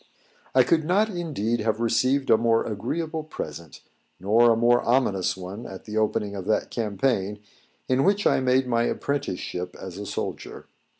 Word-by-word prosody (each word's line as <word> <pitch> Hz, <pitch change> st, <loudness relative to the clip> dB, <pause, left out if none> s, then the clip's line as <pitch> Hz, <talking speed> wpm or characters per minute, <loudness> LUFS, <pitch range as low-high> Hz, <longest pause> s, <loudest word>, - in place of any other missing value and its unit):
I 130 Hz, -, +7 dB
could 160 Hz, +5 st, +2 dB
not 195 Hz, +7 st, +2 dB
indeed 145 Hz, -, -2 dB
have 110 Hz, 0 st, -1 dB
received 130 Hz, +4 st, +1 dB
a -, -, +8 dB
more 115 Hz, 0 st, +2 dB
agreeable 155 Hz, +9 st, -3 dB
present, 80 Hz, -, -8 dB, 0.4 s
nor 110 Hz, +5 st, +4 dB
a -, -, +4 dB
more 120 Hz, +1 st, +4 dB
ominous 105 Hz, -7 st, +1 dB
one 95 Hz, +5 st, -7 dB
at 95 Hz, -, -10 dB
the 105 Hz, -, -7 dB
opening 105 Hz, -1 st, 0 dB
of 95 Hz, -2 st, -6 dB
that 110 Hz, -, 0 dB
campaign, 105 Hz, -2 st, -1 dB, 0.5 s
in 130 Hz, +1 st, +2 dB
which 200 Hz, +1 st, +2 dB
I -, -, +4 dB
made 130 Hz, 0 st, +2 dB
my 120 Hz, -1 st, +1 dB
apprenticeship 90 Hz, -11 st, -3 dB
as 95 Hz, 0 st, -8 dB
a 105 Hz, -, -6 dB
soldier. -, -, -5 dB
115 Hz, 165 wpm, -25 LUFS, 100-135 Hz, 0.5 s, a